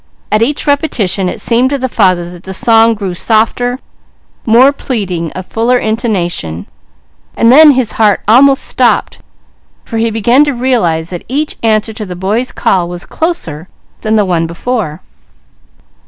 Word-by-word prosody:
At 215 - +2
each 285 +6 0
repetition 225 - 0
it - - -6
seemed 245 +2 +1
to 280 - -1
the 260 -1 -2
father 185 -7 +1
that 175 -1 -12
the 190 +1 -6
song 225 +2 +4
grew 195 -4 -4
softer, 230 +5 0 0.7
more 250 +5 +5
pleading, 185 - -4
of 185 - -7
fuller 235 +5 0
intonation; 190 - -2 0.7
and 230 +1 +4
then 300 +2 +7
his 255 -4 -1
heart 210 -3 +1
almost 270 +5 +4
stopped, - - 0 0.7
for 225 - -4
he 230 0 +1
began 235 +5 +3
to 290 - -1
realize 185 -11 0
that 175 - -6
each 295 +5 -2
answer 220 -1 0
to 215 0 -7
the 180 - -7
boy's 210 +8 -2
call 175 -2 0
was 175 0 -6
closer 180 - -4 0.3
than 220 0 0
the 210 -2 +2
one 170 -3 0
before. 175 -2 -4
220 Hz, 155 wpm, -12 LUFS, 185-250 Hz, 0.7 s, then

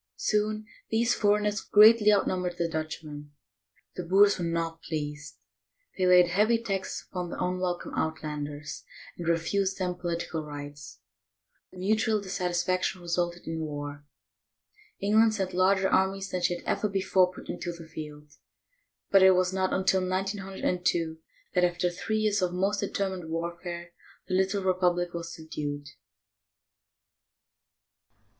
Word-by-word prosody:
Soon 215 - 0 0.2
these 230 +2 +2
foreigners 210 0 +2
greatly 210 0 +7
outnum 190 -2 +2
bered 175 -1 -3
the 170 - 0
Dutchmen. 155 -2 -6 0.6
The - - -3
Boers 195 +3 +5
were - - -2
not 165 -1 -2
pleased. 150 -2 -5 0.6
They 185 -1 +1
laid 180 -1 +7
heavy 210 +6 +3
taxes 195 -5 -4
upon 180 -2 -4
the - - -6
unwelcome 180 -1 -2
"Outlanders," 150 -2 -4 0.3
and 170 - -6
refused 190 +4 +1
them 180 -1 -1
political 170 -2 -3
rights. 145 -1 -9 0.7
The - - -14
mutual 215 +3 +1
dissatisfaction 185 -1 -1
re 170 - -8
sulted 175 0 -1
in 165 0 -3
war. 145 -2 -5 1.0
England 215 +2 +4
sent 190 -3 -2
larger 190 +1 +3
armies 195 +1 +1
than 180 - -2
she 175 0 +2
had - - -10
ever 210 - 0
before 190 -2 +2
put - - -12
into 175 - -4
the 170 -1 -10
field, 150 -2 -10 0.7
but 195 - +7
it 190 0 +7
was 185 0 +1
not 190 0 0
until 190 0 +2
1902 185 -3 -1 0.3
that, 180 - +3
after 175 0 +1
three 215 +5 -2
years 210 -2 +1
of 180 -1 0
most 195 +3 +1
determined 190 -4 -2
warfare, 170 +1 -5 0.4
the 185 - -3
little 190 +1 +1
republic 180 -2 +1
was 170 0 -5
subdued. 145 -2 -5
180 Hz, 135 wpm, -28 LUFS, 165-195 Hz, 1.0 s, greatly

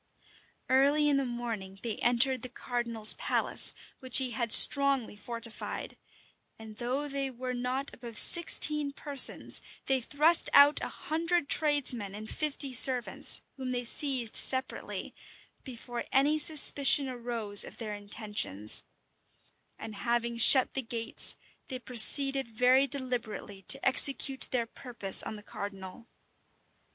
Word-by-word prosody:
Early 285 +3 0
in 280 - 0
the 275 - -3
morning, 225 -6 -9
they 230 -3 -6
entered 245 +1 +1
the 255 - -10
cardinal's 235 -3 0
palace, - - -3 0.2
which 260 -2 +2
he 260 -2 +2
had 235 -2 -5
strongly 275 -5 +4
fortified, 230 +2 -9 0.6
and 220 -1 -15
though 255 +5 -5
they 275 -1 -5
were 255 0 -8
not 250 +3 -6
above 235 -3 -12
sixteen 300 -4 +3
persons, 280 -2 0 0.2
they 265 -1 -2
thrust 305 +7 +2
out 285 +1 +4
a - - -5
hundred 330 0 -4
tradesmen 260 -9 -1
and 215 +1 -9
fifty 290 -3 -5
servants, 255 +1 +3
whom 260 -1 -8
they 245 -1 -5
seized 250 -2 -3
separately, 260 0 0 0.5
before 240 -2 -10
any 290 +3 0
suspicion 285 -2 +2
arose 235 -5 +2
of - - -13
their 215 -3 -7
intentions; 205 - -1 1.0
and 220 - -11
having 235 +2 -4
shut 250 +3 +5
the 270 - -5
gates, 230 -1 0 0.3
they 260 - -7
proceeded 270 +2 +4
very 250 +4 0
deliberately 245 -7 -7
to 275 - +2
execute 270 0 +3
their 245 -2 -3
purpose 230 -5 +2
on - - -7
the 210 - -14
cardinal. 200 +2 -11
250 Hz, 130 wpm, -27 LUFS, 230-275 Hz, 1.0 s, shut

